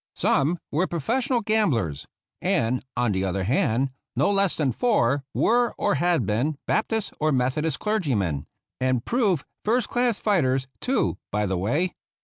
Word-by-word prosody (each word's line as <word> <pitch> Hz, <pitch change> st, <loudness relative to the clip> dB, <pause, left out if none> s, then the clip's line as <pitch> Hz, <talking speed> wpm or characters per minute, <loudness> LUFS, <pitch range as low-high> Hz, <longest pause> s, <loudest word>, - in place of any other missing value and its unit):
Some 155 Hz, +6 st, +2 dB
were 175 Hz, +6 st, +1 dB
professional 235 Hz, -, 0 dB
gamblers, 145 Hz, -, 0 dB, 0.3 s
and, 120 Hz, +3 st, +1 dB
on 120 Hz, -2 st, +2 dB
the 95 Hz, -1 st, 0 dB
other 95 Hz, 0 st, -1 dB
hand, 125 Hz, +4 st, +1 dB, 0.2 s
no 145 Hz, +10 st, +2 dB
less 195 Hz, -2 st, +2 dB
than 145 Hz, -5 st, +1 dB
four 140 Hz, -, +1 dB
were 240 Hz, +1 st, +2 dB
or -, -, +1 dB
had 165 Hz, -, +1 dB
been 125 Hz, +9 st, 0 dB
Baptist 220 Hz, -1 st, 0 dB
or 155 Hz, 0 st, +2 dB
Methodist 135 Hz, +3 st, 0 dB
clergymen 120 Hz, -, -1 dB, 0.2 s
— -, -, -37 dB
and 130 Hz, -2 st, +1 dB
proved 210 Hz, -, +1 dB, 0.2 s
first 230 Hz, +2 st, +1 dB
class 240 Hz, -3 st, +1 dB
fighters, 135 Hz, -11 st, +1 dB
too, 265 Hz, +2 st, 0 dB
by 105 Hz, +1 st, 0 dB
the 95 Hz, -1 st, -1 dB
way. 145 Hz, -, 0 dB
145 Hz, 150 wpm, -25 LUFS, -, 0.3 s, Some